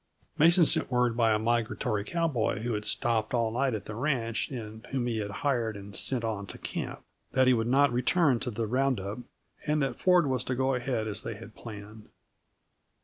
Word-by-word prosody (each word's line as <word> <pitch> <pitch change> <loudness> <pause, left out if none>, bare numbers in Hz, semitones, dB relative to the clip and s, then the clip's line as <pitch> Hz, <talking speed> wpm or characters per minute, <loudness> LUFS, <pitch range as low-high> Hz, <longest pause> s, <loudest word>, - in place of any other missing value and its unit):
Mason 170 +2 +6
sent - - +6
word 125 -2 +1
by 115 -2 +3
a 105 - +3
migratory 110 -2 -1
cowboy, 145 -8 -1
who 120 0 -1
had 105 0 -3
stopped 115 0 +1
all 115 -2 +1
night 130 +1 0
at 100 - -6
the 105 - -7
ranch 115 -2 -1
and 110 -4 -7
whom 130 -2 -2
he 115 -2 -1
had 105 -1 -3
hired 115 -1 -1
and 100 0 -10
sent 125 -3 -1
on 105 -3 -3
to - - -8
camp, - - -5 0.3
that 130 0 +4
he 130 - +5
would 115 -1 0
not 135 +1 +3
return 135 +1 +2
to 125 - -3
the 115 0 -3
round 130 +1 +1
up, 100 +5 -5 0.5
and 150 -1 +2
that 135 - -3
Ford 180 -3 +4
was 130 -2 -1
to 130 - -1
go 130 +1 +1
ahead 120 -3 -2
as 105 -1 -3
they 115 - -5
had 115 +1 -12
planned. 105 -1 -11
120 Hz, 205 wpm, -28 LUFS, 110-130 Hz, 0.5 s, Mason